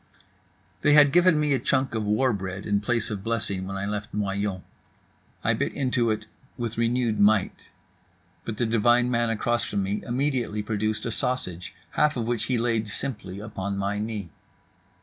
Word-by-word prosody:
They 150 - +4
had 145 -2 +7
given 175 -1 +5
me 150 -1 +2
a 135 - +2
chunk 130 +1 +1
of 110 -1 -1
war 110 +5 +2
bread 95 -1 -5
in 100 -1 +2
place 115 +1 0
of 100 -2 -4
blessing 100 -5 -2
when 100 0 -4
I 100 - -2
left 105 0 -4
Noyon. 100 -2 -1 0.8
I - - +3
bit - - -1
into 125 -4 +1
it 110 0 -1 0.3
with 115 -3 -3
renewed 115 -1 +1
might. 105 -1 +2 0.8
But 110 -2 -5
the 120 - +1
divine 120 +2 +3
man 120 -1 +2
across 120 +1 0
from 100 -1 -1
me 100 +2 -2
immediately 125 -4 -1
produced 110 0 -1
a 115 - -1
sausage, 110 -8 -3 0.2
half 150 -2 +2
of 115 - -1
which 115 -2 -1
he 125 - +1
laid 115 -2 0
simply 105 -4 -5
upon 100 -2 -4
my 100 +1 -1
knee. 105 -5 -4
110 Hz, 175 wpm, -26 LUFS, 100-120 Hz, 0.8 s, had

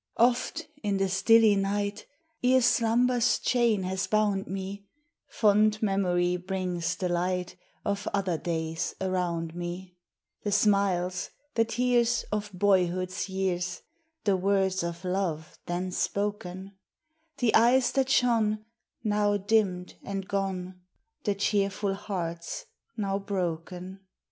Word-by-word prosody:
Oft 245 +4 +2
in 205 -2 0
the 195 0 +1
stilly 220 +3 +5
night, 200 +1 -1 0.4
Ere 255 +1 +5
slumber's 240 +1 +3
chain 235 -5 +2
has 185 +1 -2
bound 210 -2 +1
me, 195 +1 -5 0.4
Fond 215 0 +3
Memory 180 -3 +1
brings 180 -1 -2
the 185 -1 -2
light 180 +1 -1 0.3
Of 200 +1 -2
other 190 -5 0
days 160 -1 -2
around 175 -3 -1
me: 175 +1 -6 0.5
The 205 - -2
smiles, 195 -3 +2 0.2
the 230 -1 +3
tears, 240 0 +1
Of 210 0 -2
boyhood's 185 -1 +1
years, 185 -1 -2 0.4
The 200 -2 +3
words 190 0 +1
of 170 +1 -5
love 180 -4 -2
then 180 +1 -2
spoken; 195 -1 -2 0.7
The 240 -3 +2
eyes 245 +3 +5
that 265 -1 +1
shone, 220 -4 +2 0.4
Xow 205 -1 +1
dimmed 195 -5 +1
and 195 -1 -4
gone, 185 -2 -3 0.4
The 205 -2 +1
cheerful 200 0 0
hearts 175 - -4 0.3
now 195 -2 -1
broken. 185 -1 -4
195 Hz, 115 wpm, -28 LUFS, 180-210 Hz, 0.7 s, stilly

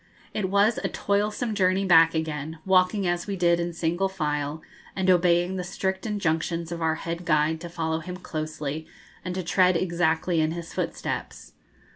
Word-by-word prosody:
It 195 -3 -1
was 200 +3 +3
a - - -2
toilsome 210 +3 -1
journey 190 -1 +2
back 165 -3 +6
again, 160 0 -3
walking 190 +1 +3
as 175 +1 -1
we 200 - -2
did 175 -2 +3
in 170 0 -1
single 170 +3 0
file, 150 -4 -2 0.3
and 190 -1 +3
obeying 175 +1 +3
the 180 - -2
strict 190 +3 -3
injunctions 170 -4 -1
of 170 -1 -4
our 160 -1 +1
head 170 +2 -5
guide 160 0 +1
to 175 - -6
follow 160 -1 -2
him 180 +2 -7
closely, 155 -2 -5 0.4
and 180 0 -4
to 185 - -2
tread 180 +1 +3
exactly 170 -1 +1
in 155 +1 +1
his 170 -1 -7
footsteps. - - -4
170 Hz, 170 wpm, -26 LUFS, 160-185 Hz, 0.4 s, back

